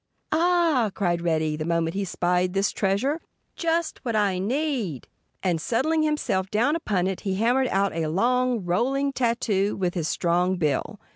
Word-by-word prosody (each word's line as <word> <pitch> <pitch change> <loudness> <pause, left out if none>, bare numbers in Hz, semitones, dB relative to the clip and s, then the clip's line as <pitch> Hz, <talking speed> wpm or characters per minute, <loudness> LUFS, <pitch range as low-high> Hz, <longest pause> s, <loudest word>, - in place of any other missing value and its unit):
"Ah!" 330 -7 +3
cried 175 -4 0
Reddy 160 -2 0
the 155 - -4
moment 165 0 0
he 200 0 -2
spied 180 0 0
this 195 +1 +1
treasure. 220 - 0 0.3
"Just 330 -1 -1
what 235 -4 -2
I 200 -3 +1
need!" 235 - -2 0.4
And 175 -4 0
settling 310 - +1
himself 300 -11 0
down 240 +10 +2
upon 200 - 0
it 190 -1 -2
he 195 -2 -2
hammered 245 +6 +2
out 195 -2 +1
a 165 -1 -1
long, 245 +3 +1
rolling 270 +10 0
tattoo 225 -5 0
with 180 -2 -1
his 165 -4 -2
strong 180 +3 +1
bill. 155 +5 -1
200 Hz, 160 wpm, -25 LUFS, 180-260 Hz, 0.4 s, Ah